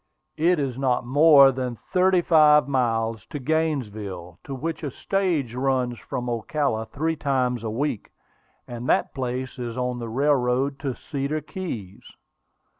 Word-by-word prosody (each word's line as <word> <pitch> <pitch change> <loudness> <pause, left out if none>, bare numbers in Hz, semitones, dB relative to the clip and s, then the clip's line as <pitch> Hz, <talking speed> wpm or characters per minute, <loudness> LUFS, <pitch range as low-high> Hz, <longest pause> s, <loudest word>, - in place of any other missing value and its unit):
It 175 +3 +3
is 135 -3 -2
not 130 -2 +1
more 140 +1 +7
than 125 -2 -3 0.2
thirty 185 0 +4
five 150 -4 +5
miles 115 -4 0
to - - -6
Gainesville, 110 - -3
to 135 - -5
which 165 +5 -4
a 150 - -3
stage 165 - -1
runs 125 -2 0
from 125 0 -5
Ocala 120 -1 -1
three 160 +7 -2
times 130 -5 -1
a 110 - -2
week; 115 0 -2 0.6
and 120 +1 -6
that - - +2
place 130 -1 -4
is 120 -1 -5
on 125 -1 -2
the 115 -1 -5
railroad 135 +1 +1
to 135 -4 -3
Cedar 140 +4 -3
Keys. 135 - -7
130 Hz, 145 wpm, -24 LUFS, 120-150 Hz, 0.6 s, more